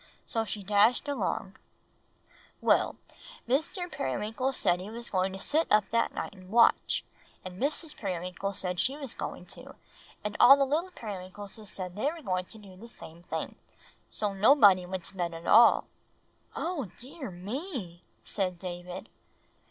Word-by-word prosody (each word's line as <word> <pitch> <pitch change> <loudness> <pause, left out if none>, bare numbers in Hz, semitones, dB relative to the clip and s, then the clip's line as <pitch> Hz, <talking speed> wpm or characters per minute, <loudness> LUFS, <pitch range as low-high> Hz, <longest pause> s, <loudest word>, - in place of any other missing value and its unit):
So 225 -1 -1
she 205 0 -5
dashed 210 +8 +4
along, 205 -7 -2 1.0
"Well, - - +3 0.5
Mr. 320 - 0
Periwinkle 220 - -1
said 180 -9 +1
he 195 - -7
was 235 +2 -5
going 185 0 +1
to 190 - -6
sit 310 +10 +1
up 210 -1 +4
that 230 0 +2
night - - -5
and 185 -2 -14
watch, 230 +3 +4 0.4
and 185 0 -8
Mrs. 300 +3 0
Periwinkle 185 0 -3
said 180 -2 -2
she 270 +3 +1
was 275 -5 -5
going - - -6
to, - - -9 0.5
and 210 0 -3
all 270 +3 +10
the 275 - +3
little 315 +7 0
Periwinkleses 205 - -7
said 185 -2 -4
they 270 +8 0
were 330 -1 -10
going 185 -4 -1
to 220 - -14
do 200 -3 -13
the 220 +6 -11
same 170 -7 -10
thing. 175 - -4 0.6
So 205 -2 -1
nobody 195 -4 +6
went 185 -1 -4
to 195 - -9
bed 170 -2 -2
at 165 +1 -9
all." 230 +2 +7 0.7
"Oh, 325 - -2
dear 265 +1 -7
me!" 195 - -6 0.2
said 185 -3 -1
David. 175 0 -7
205 Hz, 160 wpm, -29 LUFS, 185-255 Hz, 1.0 s, all